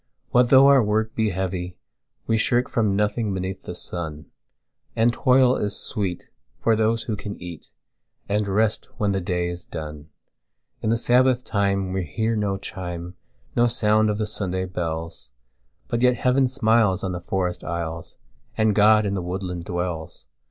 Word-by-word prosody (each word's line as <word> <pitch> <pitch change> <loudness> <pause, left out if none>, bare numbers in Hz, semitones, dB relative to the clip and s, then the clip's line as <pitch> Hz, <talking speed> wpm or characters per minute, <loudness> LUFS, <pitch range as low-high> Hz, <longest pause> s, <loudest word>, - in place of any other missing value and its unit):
What 125 0 +4
though 135 +1 +8
our 140 -1 +7
work 110 +1 0
he 110 -1 +1
heavy, 90 -1 -3 0.5
we 115 - +1
shirkFrom 115 -2 +1
nothing 105 0 0
beneath 95 +1 -4
the 90 - -7
sun; 80 -4 -5 0.7
And 115 +1 +3
toil 130 0 +4
is 105 -1 -1
sweet 95 -5 -3 0.4
to 115 - +4
those 110 +1 +1
who 110 - -3
can 100 0 -6
eatAnd 100 +4 -7
rest 105 +2 0
when 105 -1 +1
the 95 -1 -1
day 90 -1 -1
is 85 0 -5
done.In 75 +7 -9
the 115 - +3
Sabbath 125 +1 +3
time 100 -4 0
we 95 -1 -1
hear 110 +8 -1
no 100 -2 0
chime, 90 -2 -6 0.4
No 120 0 +4
sound 110 -2 +2
of 105 - 0
the 110 - -1
Sunday 95 -3 -2
bells; 85 -5 -5 0.6
But 120 - -1
yet 125 0 +4
Heaven 130 +2 +2
smiles 110 -6 +2
on 95 - -1
the 90 -1 -4
forest 90 0 -2
aisles, 85 -1 -5 0.4
And 110 -1 +3
God 105 +1 +5
in 100 - -1
the 95 - -1
woodland 90 -1 -4
dwells. 85 -3 -4
100 Hz, 160 wpm, -23 LUFS, 90-110 Hz, 0.7 s, though